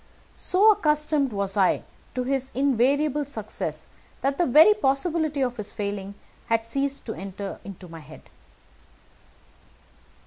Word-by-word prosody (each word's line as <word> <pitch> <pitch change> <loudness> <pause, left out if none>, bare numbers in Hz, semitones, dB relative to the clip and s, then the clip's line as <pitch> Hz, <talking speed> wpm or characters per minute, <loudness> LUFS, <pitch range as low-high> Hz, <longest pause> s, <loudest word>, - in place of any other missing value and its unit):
So 410 +4 +4
accustomed 300 - +1
was 200 -1 -2
I 195 -3 +2 0.3
to 255 - -1
his 265 0 -1
invariable 280 +3 +2
success 225 -7 -5 0.4
that 275 +1 -1
the 350 - +3
very 310 - +7
possibility 310 -3 0
of 245 -1 -2
his 210 -2 -4
failing 200 -1 -4 0.3
had 225 -1 +1
ceased 275 +4 -2
to 220 - -4
enter 195 +1 -7
into 195 -2 -10
my 165 -1 -10
head. 155 0 -13
265 Hz, 130 wpm, -25 LUFS, 205-295 Hz, 0.4 s, very